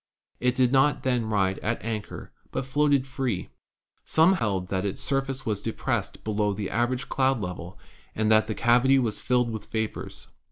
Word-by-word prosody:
It 125 0 +1
did 125 -1 +3
not 135 +2 +3
then 125 -4 0
ride 95 -3 +1
at 115 0 -3
anchor, 110 -2 -5 0.2
but 130 - -2
floated 140 0 +2
free. 130 -8 -3 0.5
Some 165 +4 +4
held 95 - -1
that 95 -1 -1
its 100 -2 -3
surface 135 -1 -1
was 105 -3 -1
depressed 115 - -3
below 105 -1 0
the 100 0 -4
average 120 +2 0
cloud 135 -2 +1
level 90 -2 -6 0.4
and 110 0 +1
that 110 0 +5
the 110 - -3
cavity 125 +3 +4
was 115 -5 0
filled 125 -2 +1
with 110 -1 -7
vapors. 110 -1 -4
115 Hz, 170 wpm, -26 LUFS, 105-130 Hz, 0.5 s, that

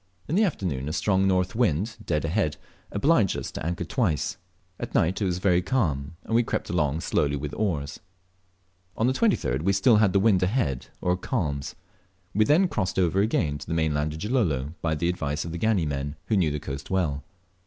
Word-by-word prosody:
In - - -3
the 205 +5 +4
afternoon 85 - -1
a - - -3
strong 95 +1 +2
north 90 -1 +1
wind 110 -1 0
(dead 75 -1 -1
ahead) 80 -3 0 0.3
obliged 105 - +2
us - - -5
to - - -6
anchor 85 +2 -2
twice. 90 - 0 0.4
At - - -6
nigh 80 - +4
it 95 - -5
was 90 -3 0 0.3
calm, 80 - 0
and - - -5
we 115 - +5
crept 115 - -3
along 80 -2 0
slowly 75 -3 +1
with 70 +1 -5
our - - -7
oars. 75 -10 -1 1.0
On 110 - +2
the 130 - +3
23d 130 - +1
we 95 +4 +2
still 105 +4 +5
had 105 -3 +4
the 100 - +3
wind 100 -2 +4
ahead, 90 - 0
or 90 0 +2
calms. 80 - -3 0.6
We 110 +2 +3
then 165 - +4
crossed 95 - -2
over 95 +1 +3
again 80 -9 0
to - - -10
the 80 - -2
mainland 75 -1 0
of 80 - -7
Gilolo 85 - 0
by 80 -1 0
the 85 +3 -1
advice 75 -3 -2
of 85 - -5
our 85 - -5
Gani 110 -5 +2
men, 70 0 -3
who 110 - +3
knew 90 -6 +3
the 75 0 -3
coast 70 -1 -6
well. 75 -7 0
90 Hz, 205 wpm, -26 LUFS, 75-105 Hz, 1.0 s, we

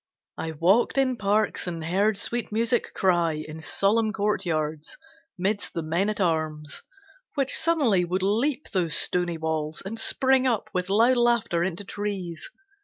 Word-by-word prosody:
I 160 0 -3
walked 185 - +2
in 260 -2 +2
parks 210 -2 0
and 165 -2 -4
heard 200 +5 +2
sweet 235 +1 -2
music 230 +2 0
cry 175 -3 +2
In 155 +1 -7
solemn 215 +6 +1
courtyards, 165 -8 -2 0.4
midst 200 +3 -2
the 165 - -2
men 170 +6 0
at 215 - -3
arms; 155 -4 -1 0.5
Which 275 -3 +1
suddenly 290 - +2
would 185 +2 -2
leap 250 +9 0
those 170 -5 0
stony 175 -2 +1
walls 160 -1 -3
And 225 +4 -2
spring 265 +2 +3
up 235 -4 -1
with 180 0 -2
loud 230 +5 +4
laughter 235 -8 +2
into 190 +2 -3
trees. 190 -5 -5
195 Hz, 150 wpm, -25 LUFS, 165-225 Hz, 0.5 s, loud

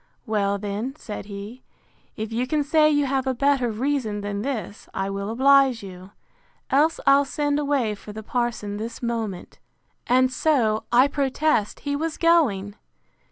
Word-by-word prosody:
Well, 200 -2 0
then, 210 +6 -4
said 210 -9 -7
he, 205 +5 -8 0.6
if 220 +1 -4
you 245 +3 -1
can 300 +1 +1
say 305 +1 +4
you 290 -1 +2
have 270 0 -1
a 260 - 0
better 275 -1 +2
reason 225 -2 -1
than 200 0 -3
this, 220 -5 -5
I 195 +1 -2
will 200 +1 -4
oblige 265 -1 +4
you; 185 -1 -10 0.6
else 300 +4 +3
I'll 275 +1 +6
send 290 +1 -1
away 280 -7 0
for 210 +1 -10
the 220 +1 -8
parson 225 -3 -2
this 225 +3 -6
moment. 225 -6 -4 0.5
And 255 +1 +3
so, 240 -7 +1
I 250 +3 +6
protest, 280 -4 0
he 285 -1 -2
was 320 +2 -3
going! 255 - +2
245 Hz, 160 wpm, -24 LUFS, 210-280 Hz, 0.6 s, I'll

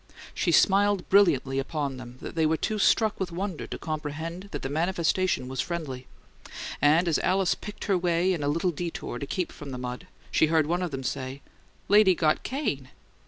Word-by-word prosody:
She 175 - 0
smiled 200 +3 +4
brilliantly 145 -9 +4
upon 140 -1 -3
them, 125 0 -10
but - - -7
they 160 -1 +2
were 160 +1 +1
too 215 +5 -2
struck 215 +1 +3
with 185 -2 -2
wonder 185 -1 -4
to - - -5
comprehend 160 +3 -5
that - - -6
the - - -1
manifestation 170 -1 0
was 130 -1 -2
friendly; 135 -6 -5 0.7
and 160 +4 +4
as 160 - +2
Alice 190 0 +2
picked 210 0 -8
her 195 -4 +1
way 175 +1 +2
in 165 - -3
a 145 - -1
little 165 +5 +1
detour 165 -6 -5
to 140 - -5
keep 180 +3 -2
from 145 - -9
the 130 - -5
mud, 125 +7 -6 0.2
she 160 - +4
heard 160 -1 +3
one 175 +4 0
of 180 - -1
them 135 -3 -5
say, 130 +1 -4 0.4
"Lady 205 -2 +6
got 155 -2 +2
cane! 145 - -3
165 Hz, 195 wpm, -27 LUFS, 140-185 Hz, 0.7 s, Lady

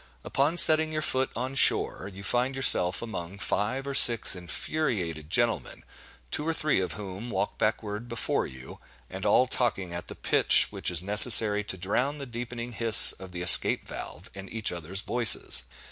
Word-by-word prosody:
Upon 145 +5 -3
setting 155 -1 0
your 155 0 -6
foot 130 -2 -3
on 130 +3 -7
shore, 100 -6 -1
you 100 +1 -14
find 125 +6 -4
yourself 95 -8 +2
among 95 -5 -10
five 110 +7 -5
or 140 - -7
six 120 -6 +6
infuriated 90 - -6
gentlemen, 120 +5 -3 0.5
two 150 - -4
or 165 - -3
three 150 -10 -2
of 90 - -6
whom 100 +3 -11
walk 100 -1 -6
backward 110 +1 -6
before 115 0 -5
you, 65 0 -14 0.3
and - - -7
all 125 - +1
talking 110 -8 -5
at 85 - -10
the - - -12
pitch - - +2
which - - -4
is 90 -1 0
necessary 105 +1 +7
to 95 - -6
drown 125 +10 -4
the 140 - -10
deepening 120 0 -10
hiss 115 -2 +6
of 95 -1 -13
the 90 0 -8
escape 90 - +3
valve - - -12
and 95 0 -13
each 110 -2 -3
other's 90 +3 -8
voices. 115 - +4
110 Hz, 175 wpm, -24 LUFS, 95-125 Hz, 0.5 s, necessary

